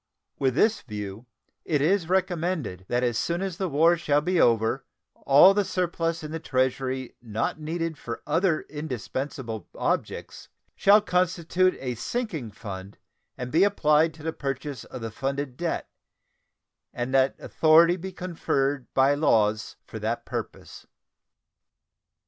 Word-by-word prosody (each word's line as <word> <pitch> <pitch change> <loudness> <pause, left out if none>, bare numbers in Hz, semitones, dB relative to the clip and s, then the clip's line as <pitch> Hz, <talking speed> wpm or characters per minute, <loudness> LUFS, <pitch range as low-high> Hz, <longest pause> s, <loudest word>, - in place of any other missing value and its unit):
With 130 -2 +1
this 220 +8 +3
view, 105 0 -7 0.4
it 150 -3 0
is 170 +3 +2
recommended 175 - -1
that 120 +1 0
as 120 -2 +1
soon 170 +2 -1
as 190 -3 -4
the 190 -2 -1
war 165 +4 +4
shall 145 -3 +2
be 175 +3 +1
over 115 +2 +2 0.3
all 145 +8 +6
the 205 0 +2
surplus 170 -3 -1
in 155 - -6
the 165 - -3
Treasury 130 -2 -1
not 115 +5 -2
needed 165 0 -3
for 120 - -6
other 165 -2 +1
indispensable 130 - -5
objects - - -3 0.3
shall 205 +2 +6
constitute 180 -1 +1
a 125 -2 -3
sinking 160 - -3
fund 100 -2 -8 0.4
and 125 0 -5
be 165 +5 +4
applied 160 -5 +3
to 155 - -13
the 160 0 -2
purchase 135 -2 -4
of 125 - -9
the 115 -1 -4
funded 135 +2 -3
debt, 170 +4 -2 1.0
and 120 +2 -4
that 135 0 +3
authority 165 +2 +4
be 190 +1 -6
conferred 145 -7 -2
by 135 +1 +5
laws 110 -8 +2
for - - -8
that - - -2
purpose. - - -7
150 Hz, 140 wpm, -26 LUFS, 125-170 Hz, 1.0 s, all